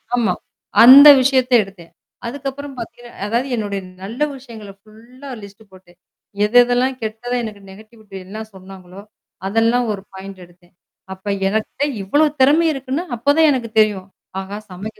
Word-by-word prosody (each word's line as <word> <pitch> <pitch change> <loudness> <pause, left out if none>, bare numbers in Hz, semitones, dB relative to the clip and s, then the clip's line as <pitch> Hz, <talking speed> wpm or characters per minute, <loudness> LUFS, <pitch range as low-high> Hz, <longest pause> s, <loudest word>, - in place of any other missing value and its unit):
ஆமா. 220 -7 +1 0.5
அந்த 270 +5 +10
விஷயத்த 260 -1 +1
எடுத்தேன். 190 -4 -15 0.4
அதுக்கப்புறம் 275 +2 -7
பார்த்தீங்கன்னா 240 0 -10 0.2
அதாவது 235 +5 -1
என்னுடைய 205 -3 -4 0.2
நல்ல 225 +9 -8 0.2
விஷயங்கள 225 -6 -12
ஃபுல்லா 235 +6 -15
லிஸ்ட் 200 +2 -14
போட்டேன். 180 -2 -19 0.5
எத 210 - -5
எதெல்லாம் 250 +2 0
கெட்டதா 225 +3 -4
எனக்கு 210 -2 -8
நெகட்டிவிட்டி 215 0 -16
என்ன 205 +4 -9
சொன்னாங்களோ! 190 0 -13 0.5
அதெல்லாம் 230 +3 +1
ஒரு 195 - -7
பாயிண்ட் 190 0 -10
எடுத்தேன். 175 0 -26 0.4
அப்ப 190 +2 -14 0.2
எனக்கிட்ட 220 +6 -3 0.2
இவ்வளவு 295 +9 +1
திறமை 300 +5 +4
இருக்குன்னு 270 +3 -4
அப்பதான் 290 +6 +3
எனக்கு 240 -5 -3
தெரியும். 205 -3 +1 0.3
ஆஹா! 195 +2 -7
சமைக்க 205 +5 -9
220 Hz, 135 wpm, -18 LUFS, 195-255 Hz, 0.5 s, அந்த